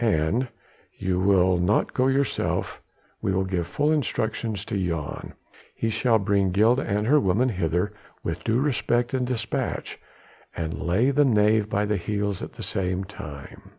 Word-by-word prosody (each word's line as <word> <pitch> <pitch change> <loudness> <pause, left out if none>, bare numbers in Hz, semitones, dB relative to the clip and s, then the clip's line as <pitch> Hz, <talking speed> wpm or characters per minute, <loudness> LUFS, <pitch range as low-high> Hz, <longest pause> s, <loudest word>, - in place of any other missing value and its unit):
An 110 +5 +1 0.5
you 90 -1 -1
will 95 -2 +4
not 95 +5 +1
go 130 0 +2
yourself 135 0 0 0.4
we 95 - 0
will 95 0 +1
give 90 -3 -2
full 145 - +1
instructions 110 -7 -1
to - - -4
Jan. 85 -6 -3 0.4
He 115 - -1
shall 115 0 +3
bring 100 -2 +1
Gilda 110 +8 +3
and 105 -2 -1
her 145 +6 +5
woman 115 +3 +2
hither 90 0 -1 0.3
with - - -3
due 115 +2 +1
respect 120 -3 0
and 125 -1 0
despatch, 115 -4 -3 0.6
and 80 -1 -4
lay 105 +11 +2
the 145 +2 +4
knave 105 -4 +3
by 105 0 +1
the 105 0 0
heels 100 +1 -2
at - - -7
the - - -8
same 95 0 -1
time. 75 -7 -9
105 Hz, 160 wpm, -25 LUFS, 95-120 Hz, 0.6 s, her